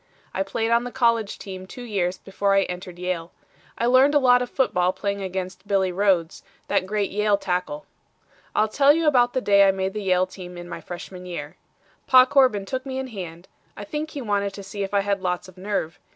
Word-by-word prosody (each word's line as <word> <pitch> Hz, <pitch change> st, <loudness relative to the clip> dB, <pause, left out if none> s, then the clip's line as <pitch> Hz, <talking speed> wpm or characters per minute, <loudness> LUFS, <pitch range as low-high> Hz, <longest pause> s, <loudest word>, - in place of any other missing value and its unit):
I 190 Hz, -, -1 dB
played 225 Hz, +4 st, -1 dB
on 235 Hz, +1 st, +3 dB
the 245 Hz, -, -5 dB
college 230 Hz, -4 st, +1 dB
team 185 Hz, -1 st, -8 dB
two 245 Hz, -, -9 dB
years 190 Hz, -6 st, -1 dB
before 195 Hz, +1 st, 0 dB
I 195 Hz, -, +4 dB
entered 180 Hz, -1 st, -7 dB
Yale. 180 Hz, -2 st, -3 dB, 0.5 s
I 235 Hz, -, 0 dB
learned 260 Hz, +4 st, +5 dB
a -, -, +8 dB
lot 250 Hz, -2 st, +5 dB
of 250 Hz, -, -3 dB
football 180 Hz, -9 st, +1 dB
playing 200 Hz, +1 st, -3 dB
against 185 Hz, 0 st, -5 dB
Billy 195 Hz, -2 st, +2 dB
Rhodes, 180 Hz, -3 st, +1 dB, 0.3 s
that 185 Hz, -, +1 dB
great 205 Hz, -1 st, -1 dB
Yale 210 Hz, 0 st, +2 dB
tackle. 185 Hz, +11 st, -3 dB, 0.7 s
"I'll 215 Hz, -, +3 dB
tell 275 Hz, +6 st, +5 dB
you 330 Hz, +1 st, 0 dB
about 245 Hz, -5 st, +4 dB
the 260 Hz, -, 0 dB
day 200 Hz, -3 st, +5 dB
I -, -, +5 dB
made 190 Hz, 0 st, -2 dB
the 210 Hz, -, -4 dB
Yale 185 Hz, -2 st, +2 dB
team 180 Hz, -1 st, -10 dB
in 175 Hz, 0 st, -8 dB
my -, -, -7 dB
freshman 180 Hz, +1 st, -8 dB
year. 175 Hz, -, -6 dB, 0.5 s
Pa 255 Hz, -1 st, +8 dB
Corbin 255 Hz, -7 st, +3 dB
took 260 Hz, +5 st, -3 dB
me 265 Hz, -1 st, -5 dB
in 265 Hz, 0 st, -4 dB
hand. 180 Hz, -5 st, -8 dB, 0.3 s
I 205 Hz, -, -6 dB
think 300 Hz, +8 st, -4 dB
he 285 Hz, -3 st, -6 dB
wanted 200 Hz, -2 st, -1 dB
to 200 Hz, -, -8 dB
see 195 Hz, +1 st, -6 dB
if 195 Hz, -, -3 dB
I 200 Hz, -1 st, +2 dB
had 200 Hz, -1 st, -1 dB
lots 180 Hz, -1 st, -2 dB
of 185 Hz, -, -15 dB
nerve. 190 Hz, -3 st, -3 dB
200 Hz, 220 wpm, -24 LUFS, 185-240 Hz, 0.7 s, a